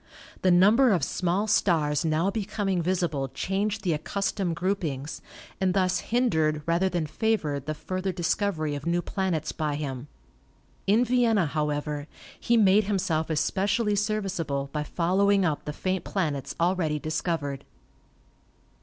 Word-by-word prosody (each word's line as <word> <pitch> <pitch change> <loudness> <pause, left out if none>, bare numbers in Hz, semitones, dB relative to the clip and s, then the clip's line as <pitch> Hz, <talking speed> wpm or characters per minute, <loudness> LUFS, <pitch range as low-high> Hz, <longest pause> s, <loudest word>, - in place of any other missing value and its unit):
The 185 - +3
number 205 +9 +6
of 170 -7 +1
small 180 +7 0
stars 155 -8 +2
now 165 +4 +1
becoming 200 -3 -1
visible 170 -6 0
changed 200 - -2
the 175 -4 +1
accustomed 190 +2 -2
groupings, 160 -6 -2 0.4
and 190 -1 +1
thus 185 -2 +2
hindered 160 -11 +1
rather 170 +3 +2
than 175 -3 -1
favored 155 -5 -1
the 155 - -2
further 185 +4 -3
discovery 170 -3 -1
of 145 +2 -5
new 175 +1 +1
planets 180 -6 -2
by 150 -2 -2
him. 140 -2 -5 0.8
In 220 +5 +4
Vienna, 235 -6 +3
however, 150 0 -2 0.3
he 235 - +2
made 205 -1 +5
himself 185 -6 0
especially 200 +7 +1
serviceable 190 -10 -2
by 150 - -1
following 190 +5 +2
up 155 -4 -1
the 150 - -3
faint 185 +4 -2
planets 150 -8 -2
already 170 -3 +1
discovered. 150 -2 -2
175 Hz, 135 wpm, -27 LUFS, 155-200 Hz, 0.8 s, number